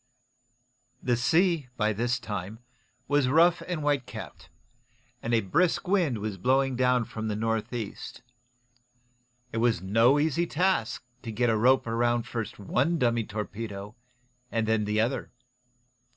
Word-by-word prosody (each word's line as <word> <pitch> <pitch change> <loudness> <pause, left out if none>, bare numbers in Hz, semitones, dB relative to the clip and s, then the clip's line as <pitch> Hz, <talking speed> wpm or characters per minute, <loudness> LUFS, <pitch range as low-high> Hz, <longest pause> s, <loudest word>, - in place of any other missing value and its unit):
The 125 - +2
sea, 160 +4 +2
by 110 -1 +1
this 120 +4 0
time, 105 -3 -5 0.5
was 145 -2 +2
rough 170 +4 +4
and 175 -4 -2
whitecapped, 145 -3 -3 0.7
and 115 - -3
a 115 -1 +3
brisk 165 - +1
wind 175 - +2
was 105 -2 -4
blowing 135 +4 +2
down 125 -1 +2
from 110 0 -5
the 105 - -1
north 115 0 -1
east. 115 -5 -6 1.3
It - - -4
was 115 -3 +2
no 115 +8 +4
easy 160 +3 +1
task 170 - 0 0.2
to 115 - -6
get 120 +2 +1
a - - +2
rope 130 +4 +4
around 120 +1 +1
first 115 -3 -5
one 135 - 0
dummy 120 -5 +1
torpedo, 105 -1 -6 0.6
and 115 -1 0
then 110 -1 +1
the 105 +1 0
other. 120 +5 -1
120 Hz, 140 wpm, -27 LUFS, 110-135 Hz, 1.3 s, rough